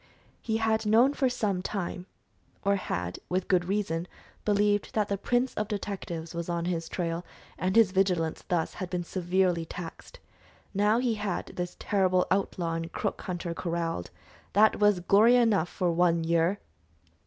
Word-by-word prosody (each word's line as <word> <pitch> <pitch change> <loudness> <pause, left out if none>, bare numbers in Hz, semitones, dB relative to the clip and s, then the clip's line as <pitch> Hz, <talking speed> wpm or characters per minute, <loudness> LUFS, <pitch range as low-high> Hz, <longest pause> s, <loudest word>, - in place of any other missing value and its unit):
He 220 -1 -1
had 220 -1 +1
known 235 +6 +5
for 265 -3 +1
some 205 -6 -1
time, 185 -2 -4 0.6
or 200 0 +4
had, 90 - -3
with 185 0 -1
good 180 -2 +2
reason, 180 -3 -1 0.4
believed 205 0 +1
that 210 -2 +1
the 200 - +1
prince 245 +4 +1
of 215 - -2
detectives 190 -6 -5
was 170 0 -4
on 170 -1 -1
his 165 -2 -2
trail, 170 -1 -2 0.3
and 185 +2 -1
his 225 -5 +6
vigilance 180 -4 +1
thus 170 -3 0
had 185 -2 -5
been 180 -1 -2
severely 180 -1 0
taxed. 165 +1 -9 0.6
Now 210 +3 +3
he 245 -1 +1
had 205 -4 -2
this 180 0 -4
terrible 185 -3 +2
outlaw 185 -3 0
and 165 0 -4
crook - - -3
hunter 175 -2 -4
corralled; 170 - -3 0.4
that 215 +2 +5
was 205 -3 +4
glory 210 +7 +5
enough 220 -8 +3
for 180 -2 0
one 170 -1 +2
year! 170 +4 +2
185 Hz, 160 wpm, -28 LUFS, 170-210 Hz, 0.6 s, his